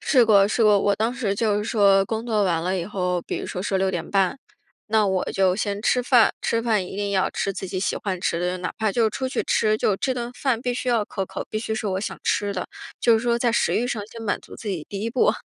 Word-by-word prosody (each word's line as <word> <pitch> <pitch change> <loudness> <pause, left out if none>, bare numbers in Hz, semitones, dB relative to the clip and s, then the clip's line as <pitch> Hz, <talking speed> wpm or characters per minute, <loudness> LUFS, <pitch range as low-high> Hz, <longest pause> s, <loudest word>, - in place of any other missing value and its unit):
试 250 -5 +4
过 200 -3 +5
试 225 - +1
过。 210 -1 +6
我 200 0 +2
当 225 +4 0
时 225 -6 -1
就 210 -1 +1
是 210 - -3
说 200 -3 +4
工 225 +2 -3
作 215 -3 +1
完 165 -3 0
了 185 +2 -1
以 170 - -3
后， 180 -3 -1
比 - - -4
如 - - -5
说 180 - -4
说 195 - 0
6:30， 190 +3 0 0.5
那 215 -1 +2
我 190 -1 0
就 190 -1 +2
先 205 -1 -2
吃 250 +2 +2
饭， 245 -2 +5
吃 230 0 0
饭 215 -6 +1
一 190 - -8
定 205 0 -2
要 190 -1 +1
吃 195 - -2
自 190 - -5
己 185 0 -3
喜 - - -1
欢 185 -3 -3
吃 170 - 0
的， 180 +1 -1
哪 180 - -4
怕 215 -1 +1
就 225 -3 +2
出 260 +4 -3
去 - - -1
吃， 215 0 +2
就 205 -2 +1
这 260 +5 -1
顿 240 -1 -4
饭 250 -4 0
必 245 -1 -1
须 250 +1 -3
要 230 -3 +2
可 195 -2 -4
口， - - -6
必 215 - -2
须 220 0 -3
是 220 -1 -3
我 190 -1 -1
想 210 - -5
吃 205 -1 0
的， 185 - -4 0.3
就 235 - +5
是 - - -3
说 235 0 +1
在 235 -1 +1
食 - - +1
欲 245 - +1
上 220 -4 -3
先 225 +1 -10
满 200 - -1
足 - - -13
自 220 - -7
己 175 -6 -3
第 200 0 -5
一 230 - -2
步。 255 - +3
210 Hz, 290 characters per minute, -23 LUFS, 195-230 Hz, 0.5 s, 过